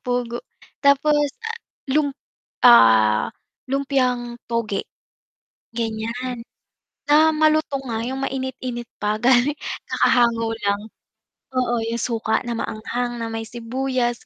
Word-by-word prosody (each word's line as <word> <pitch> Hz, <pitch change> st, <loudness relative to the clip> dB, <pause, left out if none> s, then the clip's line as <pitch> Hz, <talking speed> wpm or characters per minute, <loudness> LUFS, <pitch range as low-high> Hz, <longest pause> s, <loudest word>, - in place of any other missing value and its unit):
pugo 245 Hz, -1 st, -2 dB, 0.4 s
tapos, 290 Hz, +1 st, +4 dB, 0.2 s
ah, 455 Hz, +1 st, -4 dB, 0.3 s
lump 285 Hz, -2 st, +1 dB, 0.5 s
ah, 110 Hz, -, +6 dB, 0.4 s
lumpiang 255 Hz, -3 st, 0 dB
toge. 230 Hz, -4 st, -1 dB, 1.0 s
Ganyan, 230 Hz, +2 st, -3 dB, 0.6 s
na 300 Hz, +2 st, +5 dB
malutong 310 Hz, -3 st, +2 dB
nga, 230 Hz, -3 st, -3 dB
yung 265 Hz, +1 st, -3 dB
mainit-init 255 Hz, -3 st, -4 dB
pa 210 Hz, +1 st, -1 dB
galing 260 Hz, +4 st, +3 dB, 0.3 s
kakahango 235 Hz, -2 st, +2 dB, 0.2 s
lang, 200 Hz, 0 st, +1 dB, 0.7 s
oo 250 Hz, -2 st, +1 dB
yung 230 Hz, +1 st, -2 dB
suka 220 Hz, -2 st, 0 dB
na 240 Hz, -2 st, -4 dB
maanghang, 235 Hz, +2 st, -3 dB
na 230 Hz, -, -3 dB
may 225 Hz, 0 st, -4 dB
sibuyas, 240 Hz, +1 st, -2 dB
240 Hz, 105 wpm, -22 LUFS, 230-270 Hz, 1.0 s, ah